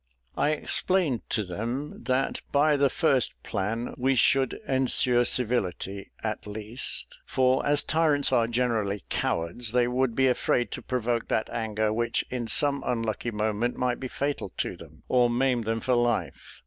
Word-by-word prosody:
I 145 Hz, -, +2 dB
explained 155 Hz, -, 0 dB
to 110 Hz, -, 0 dB
them 115 Hz, +10 st, -5 dB
that 130 Hz, +1 st, 0 dB
by 150 Hz, +1 st, +4 dB
the 140 Hz, -1 st, +3 dB
first 135 Hz, -4 st, +2 dB
plan 110 Hz, +4 st, -3 dB
we 135 Hz, +2 st, +2 dB
should 135 Hz, +2 st, +3 dB
ensure 130 Hz, -2 st, +3 dB
civility, 100 Hz, -6 st, 0 dB
at 110 Hz, -1 st, -3 dB
least; 110 Hz, +4 st, -5 dB
for 130 Hz, 0 st, +2 dB
as 145 Hz, 0 st, +3 dB
tyrants 155 Hz, -4 st, +2 dB
are 120 Hz, -3 st, +3 dB
generally 115 Hz, -4 st, -1 dB
cowards, 85 Hz, +8 st, -1 dB
they 125 Hz, -1 st, +3 dB
would 125 Hz, -1 st, 0 dB
be 130 Hz, 0 st, +3 dB
afraid 125 Hz, -1 st, +1 dB
to -, -, -5 dB
provoke 120 Hz, -2 st, -1 dB
that 110 Hz, -, -1 dB
anger 110 Hz, -1 st, -1 dB
which 115 Hz, +1 st, 0 dB
in 125 Hz, -2 st, -3 dB
some 140 Hz, +2 st, +2 dB
unlucky 115 Hz, -1 st, -2 dB
moment 110 Hz, +2 st, -1 dB
might 125 Hz, -1 st, 0 dB
be 130 Hz, -, -4 dB
fatal 140 Hz, +3 st, -3 dB
to -, -, -2 dB
them, -, -, -15 dB
or 125 Hz, -1 st, +3 dB
maim 125 Hz, 0 st, +1 dB
them 115 Hz, 0 st, -1 dB
for 125 Hz, -, 0 dB
life. 120 Hz, -1 st, -1 dB
120 Hz, 160 wpm, -27 LUFS, 110-130 Hz, -, by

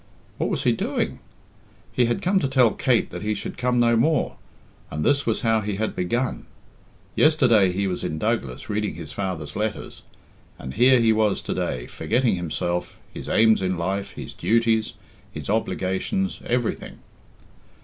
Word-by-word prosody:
What -, -, 0 dB
was -, -, -1 dB
he -, -, +4 dB
doing? -, -, -2 dB, 0.7 s
He 125 Hz, -, +3 dB
had 120 Hz, 0 st, -1 dB
come 190 Hz, +2 st, +3 dB
to 155 Hz, -, 0 dB
tell 130 Hz, -4 st, +4 dB
Kate 125 Hz, -4 st, +1 dB
that -, -, -6 dB
he 105 Hz, 0 st, -1 dB
should 100 Hz, -, -5 dB
come 125 Hz, -1 st, +1 dB
no 120 Hz, -1 st, +4 dB
more, 150 Hz, +7 st, +1 dB, 0.5 s
and 75 Hz, +1 st, -3 dB
this 140 Hz, -2 st, +2 dB
was 110 Hz, -, +1 dB
how 115 Hz, -1 st, +2 dB
he 105 Hz, -1 st, -3 dB
had 110 Hz, +2 st, -2 dB
begun! 120 Hz, +8 st, -2 dB, 0.7 s
Yesterday 120 Hz, -, +4 dB
he 100 Hz, +2 st, -1 dB
was 90 Hz, -2 st, -2 dB
in 80 Hz, -, -3 dB
Douglas 90 Hz, -, -2 dB
reading 105 Hz, 0 st, -2 dB
his -, -, -8 dB
father's 90 Hz, -7 st, -4 dB
letters, 110 Hz, 0 st, -4 dB, 0.6 s
and 65 Hz, -, -7 dB
here 125 Hz, +3 st, +5 dB
he 115 Hz, -1 st, +4 dB
was 110 Hz, -2 st, +2 dB
to -, -, -3 dB
day, 60 Hz, -1 st, -2 dB
forgetting 120 Hz, -, 0 dB
himself, 85 Hz, 0 st, -3 dB, 0.2 s
his -, -, -7 dB
aims 110 Hz, -1 st, +4 dB
in 95 Hz, -1 st, -1 dB
life, 95 Hz, +3 st, -2 dB
his -, -, -8 dB
duties, 115 Hz, -1 st, +1 dB, 0.4 s
his -, -, -5 dB
obligations 110 Hz, -, -1 dB
everything. 120 Hz, -1 st, -2 dB
110 Hz, 165 wpm, -24 LUFS, 95-120 Hz, 0.7 s, here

